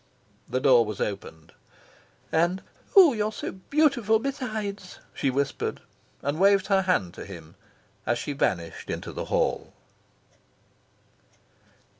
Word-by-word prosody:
The 130 - 0
door 130 -3 +6
was 105 -2 -6
opened. 80 -6 -5 0.8
"And 175 +4 +1 0.3
oh, 360 -8 +9
you're 215 -1 -1 0.4
beautiful 275 -8 +3
besides!" 220 -7 -4 0.2
she 140 - 0
whispered; 135 +1 -2 0.4
and 145 +3 -1
waved 195 0 +5
her 195 -1 +3
hand 180 - 0
to - - -8
him 85 -5 -11 0.5
as 120 +1 +2
she 145 - -4
vanished 85 -11 -2
into - - -4
the - - -5
hall. - - -1
180 Hz, 115 wpm, -26 LUFS, -, 0.8 s, oh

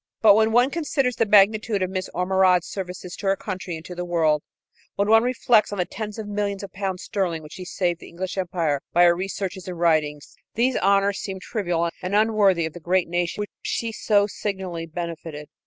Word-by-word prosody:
But 210 -2 +9
when 220 +1 +3
one 245 +4 +4
considers 275 -6 -1
the 225 - +2
magnitude 210 0 +4
of 185 - -2
Miss 185 0 -3
Ormerod's 180 -1 +3
services 180 -2 -6
to 200 - -4
her 195 - +3
country 190 -3 -5
and 160 0 -10
to 180 - -7
the 180 0 -4
world, 160 -4 +1 0.5
when 200 +1 +1
one 225 +1 +6
reflects 240 -3 +2
on 205 - -4
the 180 - +1
tens 210 +2 -6
of 220 -2 -5
millions 205 -1 -2
of 200 - -8
pounds 190 -2 -3
sterling 175 -6 -2
which 150 - -11
she 185 - -8
saved 175 -2 -1
to - - -12
the - - -15
British 185 +2 -4
Empire 170 -6 -1
by 175 - +5
her 175 -1 +6
researches 190 0 -4
and 180 -2 -5
writings, 155 -3 +1 0.2
these 245 +3 +2
honors 200 0 +2
seem 190 -1 -5
trivial 175 -5 -1
and 185 +2 -2
unworthy 205 -5 +3
of 160 - -5
the 175 - -9
great 180 +2 +1
nation 175 +3 -1
which 205 - -5
she 230 -1 -2
so 205 -2 +2
signally 190 -5 -4
benefited. 165 -2 -6
190 Hz, 210 wpm, -24 LUFS, 175-205 Hz, 0.5 s, But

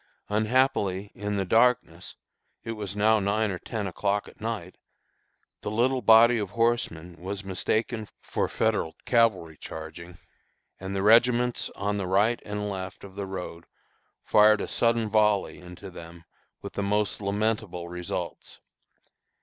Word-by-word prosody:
Unhappily, 105 -3 +1
in 105 0 -3
the 100 -1 0
darkness 115 +6 +2 0.5
it 115 - -4
was 105 -3 -5
now 110 +1 +4
nine 105 +1 0
or 90 - -4
ten 110 -4 -4
o'clock 100 +2 -1
at - - -16
night 110 -6 -4 0.9
the - - -4
little 125 +4 +1
body 115 +2 +6
of 100 -3 -3
horsemen 90 -6 -1
was 95 +2 -5
mistaken 110 +4 -1
for - - -2
Federal 110 -7 0
cavalry 105 -10 +2
charging, 85 +2 -9 0.6
and 95 +1 -5
the 95 - -1
regiments 120 +3 +4
on 100 +1 -1
the 95 -2 -3
right 105 +6 +2
and 105 0 -4
left 95 -2 -6
of 100 -1 -10
the 100 0 -5
road 90 -3 -7 0.6
fired 105 0 +5
a - - -3
sudden 115 -1 +1
volley 105 -2 +2
into 90 +2 -11
them 85 0 -11 0.4
with - - -7
the - - -2
most 105 +1 0
lamentable 100 -3 -1
results. 90 0 -6
105 Hz, 140 wpm, -27 LUFS, 95-110 Hz, 0.9 s, body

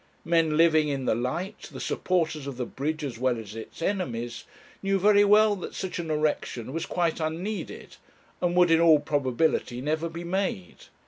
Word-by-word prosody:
Men 165 -2 +2
living 160 -2 +4
in 135 -2 -2
the - - +2
light, 150 - -4
the - - -8
supporters 160 -5 -1
of 135 -3 -6
the 125 - -2
bridge 155 +5 -3
as 125 -5 -5
well 125 -1 +1
as 105 -2 -8
its 115 +8 -8
enemies, 120 - -3 0.4
knew 195 0 +1
very 205 +1 +5
well 210 +1 +5
that 180 - -7
such 190 -2 -4
an 165 -2 -4
erection 150 -5 -1
was 165 - -3
quite 170 -2 0
unneeded, 170 +7 -4 0.4
and 175 0 +1
would 180 -1 +5
in 165 - +5
all 160 -3 +6
probability 140 -3 0
never 155 +5 -1
be 165 +1 -7
made. 175 - -3
160 Hz, 180 wpm, -27 LUFS, 135-180 Hz, 0.4 s, all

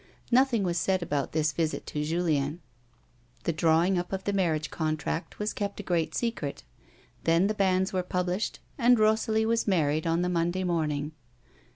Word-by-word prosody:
Nothing 245 -3 +4
was 175 -2 0
said 185 +2 +1
about 145 -4 -2
tthis 155 0 +1
visit 160 -2 -1
to 150 - -3
Julien. 155 -2 0 0.8
The 170 - 0
drawing 165 +3 +3
up 175 - -5
of 190 0 -3
the 205 - -1
marriage 160 -6 0
contract 155 +1 -2
was 210 +1 -2
kept 200 -1 -4
a - - -4
great 170 -4 -1
secret; 230 - -3 0.6
then 165 +3 +4
the 210 - +1
bans 190 -2 +1
were 185 - +1
published 180 +2 -2 0.2
and 245 0 +5
Rosalie 220 0 +2
was 230 0 +1
married 155 -4 +1
on 165 +2 +1
the - - 0
Monday 175 +1 0
morning. 155 -4 -1
175 Hz, 170 wpm, -28 LUFS, 160-200 Hz, 0.8 s, and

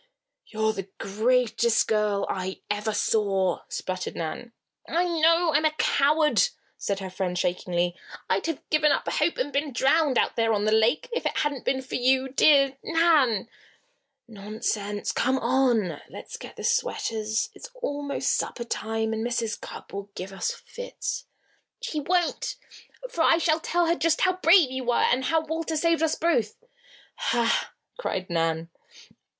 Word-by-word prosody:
"You're 220 0 0
the 195 -2 -6
greatest 235 +2 +1
girl 210 -2 +1
I 190 0 -4
ever 210 +1 -1
saw!" 195 -4 +1
sputtered 185 0 -4
Nan. 165 +8 -5 0.4
"I 340 +2 +2
know 330 0 +3
I'm 300 +2 +3
a 310 0 +2
coward," 300 +1 +3 0.3
said 200 -1 -3
her 190 - -5
friend, 180 -1 -2
shakingly. 175 0 0 0.3
"I'd 195 +11 0
have 325 -4 -4
given 305 -1 +4
up - - 0
all - - -1
hope 320 +3 +1
and 285 +3 -2
been 285 +1 0
drowned, 275 +2 +2
out - - +1
there 225 -1 +2
on 205 0 0
the 215 - +2
lake, 225 - +3
if 480 - -1
it - - -3
hadn't 295 -4 -1
been 265 0 0
for 260 - -11
you, 260 +1 +2
dear 275 0 +4
Nan." 310 - +3 0.8
"Nonsense! 210 -1 -3
Come 260 +2 +1
on! 235 - +1
Let's - - -9
get - - -10
the - - -8
sweaters. 225 - -1
It's 485 - -11
almost 290 - -2
supper 240 - -2
time 225 -1 -2
and 220 0 -2
Mrs. 235 -2 -2
Cupp - - -10
will 200 0 -6
give 190 +2 -6
us 190 - -1
fits." - - -5 0.5
"She 310 - -3
won't, 350 +3 0 0.5
for 475 -10 -3
I 325 - +5
shall 325 -1 +2
tell 345 +1 +1
her 335 - +3
just 330 -2 +1
how 370 - +4
brave 335 -5 +5
you 260 0 -3
were, 240 0 +2
and 255 +2 +2
how 320 +1 +1
Walter 320 0 -2
saved 335 +1 +2
us 320 -1 +2
both." 245 -11 +1 0.6
"Ha!" 235 -1 +1 0.3
cried 185 - -3
Nan. 165 0 -1
255 Hz, 160 wpm, -26 LUFS, 210-315 Hz, 0.8 s, I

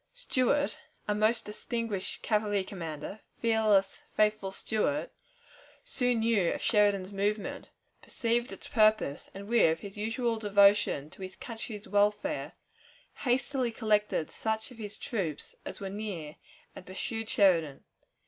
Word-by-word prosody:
Stuart, 290 - +1 0.3
our 210 - +2
most 215 +3 +2
distinguished 215 -2 -3
cavalry 210 -2 +1
commander 170 +1 -6 0.2
fearless, 215 -4 +3 0.2
faithful 210 -2 +2
Stuart 230 - -1 0.7
soon 245 -3 +1
knew 220 -6 +3
of - - -4
Sheridan's 205 -3 +2
movement, 205 +1 -2 0.3
perceived 235 -1 -1
its 195 - -8
purpose, 215 -9 +2
and, 200 +1 -7
with 185 -9 +4
his 200 0 -9
usual 225 +2 -1
devotion 200 -7 +4
to - - -14
his 190 0 -6
country's 220 -2 -7
welfare, 205 0 +1 0.6
hastily 255 -1 +1
collected 210 -7 +1
such 220 +2 -2
of 240 - -13
his 210 -1 -5
troops 170 - -3
as - - -6
were 195 - -4
near, 190 -7 -5 0.4
and - - -9
pursued 225 +4 -4
Sheridan. 165 -8 +3
210 Hz, 125 wpm, -30 LUFS, 195-230 Hz, 0.7 s, with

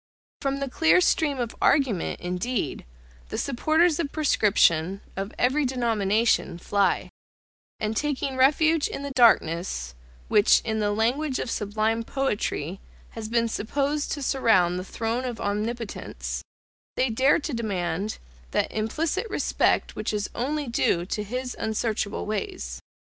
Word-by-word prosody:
>From 275 0 0
the 275 0 -2
clear 320 +7 +4
stream 310 -5 +2
of 235 -2 -3
argument, 260 - +2
indeed, 185 +7 -2 0.4
the - - -4
supporters 310 +5 +2
of 300 -4 -1
prescription, 195 - +2
of 195 +2 -4
every 265 +5 +2
denomination, 225 -6 +1
fly: 200 +3 0 0.7
and 215 +1 -1
taking 275 0 -1
refuge 305 +4 +4
in 280 - -6
the 280 - -4
darkness, 170 - +2 0.3
which, 210 -1 +5
in 220 -1 -2
the 205 -1 +1
language 255 +7 0
of 230 - -3
sublime 215 +2 0
poetry, 205 - -2 0.3
has 220 -1 -7
been 230 0 +2
supposed 280 +7 -1
to 285 - -4
surround 190 -10 +3
the - - -4
throne 225 +5 -2
of 245 -3 -4
Omnipotence, 215 +2 -3 0.5
they 255 -2 +1
dare 260 +6 +4
to 300 -1 -4
demand 195 -3 -2 0.3
that - - 0
implicit 315 - -1
respect - - +1
which - - -3
is 205 -1 -3
only 290 +4 -2
due 185 -7 +1
to 210 +3 -3
His 250 +4 -4
unsearchable 220 -1 -1
ways. 65 - -4
230 Hz, 135 wpm, -26 LUFS, 205-275 Hz, 0.7 s, which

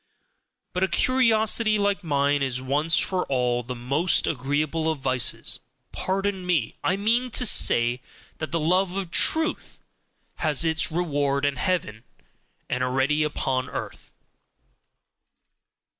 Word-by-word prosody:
But 180 - -1
a - - +3
curiosity 225 -3 +2
like 200 -1 0
mine 145 -2 +1
is 130 -2 -1
once 145 +5 +1
for 185 -1 0
all 125 -2 0
the 125 +1 -7
most 140 +9 +1
agreeable 150 +3 -1
of 160 - -1
vices 130 -3 0 0.3
pardon 195 0 -2
me! 170 -10 0
I 185 - +1
mean 235 +5 +1
to 250 +1 +2
say 120 - +3 0.4
that 155 - -5
the 170 - 0
love 180 +4 +1
of 190 -4 -4
truth 320 - +1 0.6
has 155 0 +1
its 160 0 +2
reward 145 -4 -1
in 140 -2 -1
heaven, 125 - -2 0.6
and 125 - -2
already 135 +4 +1
upon 135 -4 -1
earth. - - -7
155 Hz, 130 wpm, -24 LUFS, 135-185 Hz, 0.6 s, a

